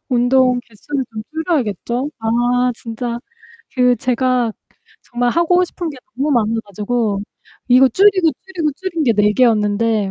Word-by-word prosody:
운동 250 0 +3
개수를 265 +5 -4
좀 215 -1 -6
줄여야겠죠? 275 - -2
아 240 +2 +1
진짜 235 +1 -5 0.6
그 250 -1 +3
제가 250 -2 0 0.5
정말 240 0 -1
하고 355 +3 +3
싶은 345 -1 -5
게 280 - -10 0.2
너무 285 +4 0
많아 225 -4 +2
가지고 210 +1 -2 0.5
이거 255 +1 +6
줄이고, 375 - +4
줄이고, 355 -5 -2
줄인 345 -4 -2
게 235 - +4
4 210 -1 +3
개였는데 215 -3 +2
245 Hz, 275 characters per minute, -18 LUFS, 225-290 Hz, 0.6 s, 이거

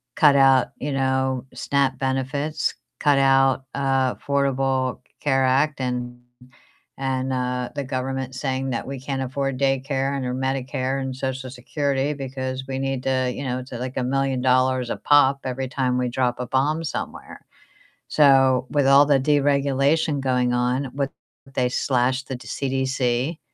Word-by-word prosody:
cut 145 -2 +5
out, 135 -2 +5
you 145 - -4
know, 130 -1 0
SNAP 140 -2 0
benefits, 135 +3 -1 0.3
cut 145 -1 +3
out, 135 -1 +3
uh, 135 -2 +1
Affordable 135 -2 0 0.2
Care 135 -2 +2
Act 135 +3 +2
and 125 -1 -3 0.8
and, 130 -1 -1
uh, 125 -1 -2
the 140 -1 -3
government 130 0 -3
saying 130 0 -2
that 120 - -3
we 135 0 -6
can't 135 0 -3
afford 135 0 -2
daycare 135 0 0
and 135 - -3
or 125 - -2
Medicare 130 0 -2
and 130 -1 -4
Social 130 0 -4
Security 140 +2 -1
because 130 -2 -5
we 130 0 -3
need 135 -1 -2
to, 130 -1 +1
you 140 - -5
know, 125 -1 -2
it's 130 +1 -9
like 125 +1 -5
a 130 - 0
million 135 0 0
dollars 130 -1 +2
a - - -1
pop 140 -2 +4
every 130 0 -3
time 130 -1 0
we 125 0 0
drop 125 -1 0
a 125 - -3
bomb 145 +6 0
somewhere. - - -6 0.6
So, 135 -3 +4
with 145 -2 +1
all 140 +1 +7
the 140 -2 +3
deregulation 140 +1 +2
going 125 -2 +1
on, 125 +2 0
with 140 -1 -1 0.4
they 125 -1 +1
slashed 130 +1 0
the 130 - -4
CDC, 130 +3 -1
130 Hz, 155 wpm, -23 LUFS, 130-135 Hz, 0.8 s, all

